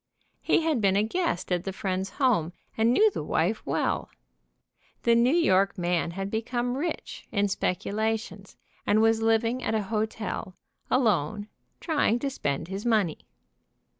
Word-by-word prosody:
He - - +3
had 310 -7 +1
been 195 -2 +3
a 205 - +3
guest 275 - -2
at 175 -1 +1
the 195 - -3
friend's 190 0 -2
home, 210 - +2 0.2
and 225 +1 +3
knew 425 - +5
the - - -4
wife - - 0
well. - - -1 0.9
The 235 - +4
New 240 +6 +4
York 200 - +3
man 175 -1 0
had 195 +1 -3
become 240 +2 -1
rich, 325 +5 -4
in 205 -1 +1
speculations, 200 +1 -2 0.3
and 210 - +4
was 225 0 +3
living 225 +2 +2
at 220 - -1
a 215 - 0
hotel, 215 -2 -3 0.3
alone, 210 - +1 0.3
trying 300 -8 +1
to 275 +3 -2
spend 145 - -2
his 195 +2 -5
money. 215 -9 0
220 Hz, 150 wpm, -27 LUFS, 190-240 Hz, 0.9 s, knew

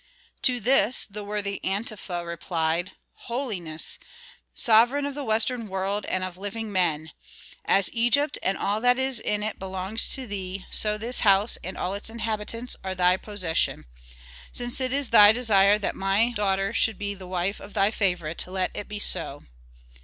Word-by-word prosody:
To 250 -1 +3
this 240 0 +3
the 210 +1 -7
worthy 200 -1 -2
Antefa 195 -3 -3
replied, 170 +1 -2 0.4
"Holiness, 200 - -3 0.6
sovereign 240 +5 +4
of 285 - -4
the 290 +1 -5
western 230 0 +1
world, 195 +2 -1
and 185 - -2
of 185 -1 -6
living 210 +2 -5
men! 160 -5 0 0.5
As 195 -1 +2
Egypt, 240 +5 +2
and 190 - 0
all 205 +2 -1
that 245 +1 +3
is 265 -2 0
in 210 -1 -1
it 215 0 -3
belongs 190 +3 0
to 265 - -3
thee, 195 -3 -6
so 210 0 +2
this 235 +4 -2
house 200 +1 +3
and 185 - -6
all 185 - -2
its 200 +2 -3
inhabitants 225 +1 -4
are 190 0 -3
thy 180 0 +4
possession. 190 -5 -1 0.7
Since 245 +1 -3
it 255 -1 -1
is 280 -1 -1
thy 210 -2 +9
desire 210 -4 +4
that 210 - -3
my 195 +5 +2
daughter 195 -2 0
should 225 -2 +2
be 205 0 -3
the 190 -2 -11
wife 185 +2 -1
of 200 - -12
thy 200 +2 +3
favorite, 180 -7 0
let 185 0 -1
it 205 - -6
be 210 - -6
so." 145 -7 0
205 Hz, 170 wpm, -25 LUFS, 190-230 Hz, 0.7 s, thy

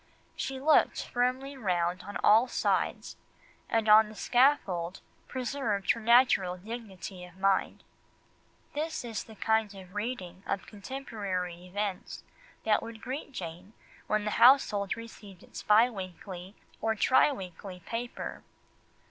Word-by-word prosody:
She 265 0 -4
looked 305 +3 +3
firmly 255 +3 -1
round 180 -6 0
her - - -14
on 205 - -4
all 225 +4 +6
sides, - - -1 0.5
and 225 -1 +1
on 215 0 +7
the 215 - -11
scaffold 200 -9 +2 0.3
preserved 250 -6 -1
her - - -2
natural 230 -6 +4
dignity 195 -3 -8
of 180 0 -13
mind." 195 0 +1 0.9
This 310 -2 -3
is 225 -2 -4
the 220 - -14
kind 220 -1 +1
of 185 -1 -12
reading 205 -5 -4
of 195 - -2
contemporary 195 -6 -5
events 200 0 -4 0.4
that 215 -1 +3
would 230 -1 -8
greet 260 +4 -6
Jane 180 -1 -8 0.3
when 215 0 0
the 210 - -1
household 230 -6 +5
received 210 -5 -11
its - - -9
bi 215 +3 +5
weekly 185 -2 -8 0.3
or 220 0 +1
tri 260 +6 +4
weekly 185 -5 -8
paper. 235 +7 -5
210 Hz, 130 wpm, -30 LUFS, 185-245 Hz, 0.9 s, on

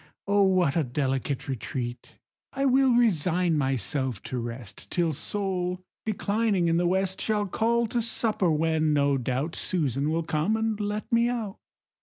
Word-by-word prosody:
O 200 0 +3
what 185 -7 +3
a 165 - +2
delicate 135 +1 -2
retreat! 125 -2 -5 0.4
I 275 +1 0
will 265 -1 +4
resign 180 -6 +2
myself 130 -3 -1
to 130 - -4
rest 115 -2 -7
Till 170 -3 0
Sol, 180 +1 -2 0.3
declining 205 -3 +1
in 165 0 +2
the 175 0 +2
west, 190 +1 0
Shall 210 -2 +1
call 235 +4 +1
to 235 +2 -1
supper, 220 -4 +1
when, 160 0 +1
no 140 -1 +2
doubt, 130 +6 -2
Susan 145 -5 0
will 165 +1 0
come 160 +8 0
and 220 -1 -1
let 210 0 -3
me 235 +1 +4
out." 225 -5 -4
175 Hz, 155 wpm, -27 LUFS, 140-210 Hz, 0.4 s, will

